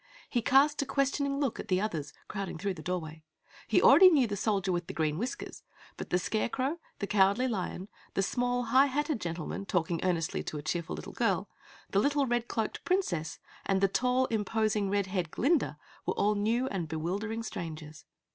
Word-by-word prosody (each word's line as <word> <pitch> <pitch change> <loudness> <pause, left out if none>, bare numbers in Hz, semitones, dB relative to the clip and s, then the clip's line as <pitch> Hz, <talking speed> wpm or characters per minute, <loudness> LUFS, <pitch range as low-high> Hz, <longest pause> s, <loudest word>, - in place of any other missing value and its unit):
He 240 - 0
cast 285 +4 +4
a - - -1
questioning 275 0 0
look 275 -6 -1
at - - -6
the 185 -1 +2
others, 160 -9 -3 0.2
crowding 195 -4 -4
through 195 +3 -2
the 160 - -9
doorway. 160 -2 -4 0.5
He 215 - +3
already 350 +7 +9
knew 290 -7 +4
the 205 -3 -3
Soldier 195 -2 0
with 175 -1 -2
Green 155 0 0
Whiskers, 245 +4 -5 0.3
but - - -7
the 180 - +2
Scarecrow, 255 - -1 0.2
the 200 - -2
Cowardly 200 +5 +3
Lion, 190 -4 -3 0.3
the 195 - +2
small, 245 +3 0
High 260 +4 +5
Hatted 290 -1 -1
gentleman 170 +3 -4
talking 170 -1 0
earnestly 170 -3 0
to 155 - -5
a 145 - -6
cheerful 165 +1 -2
little - - -8
girl, - - 0 0.4
the 195 - +3
little, 285 +4 +2
red 240 -1 0
cloaked 220 -2 -3
Princess 180 - -1 0.3
and 195 -1 +1
the 195 - +4
tall, 250 +6 +2
imposing, 215 -1 0
red 200 0 +1
haired 185 -3 -2
Glinda 295 - +1 0.3
were - - 0
all 210 +1 +2
new 225 +5 +1
and 180 -5 -3
bewildering 195 +8 -3
strangers. 155 -7 -7
205 Hz, 185 wpm, -30 LUFS, 175-250 Hz, 0.5 s, already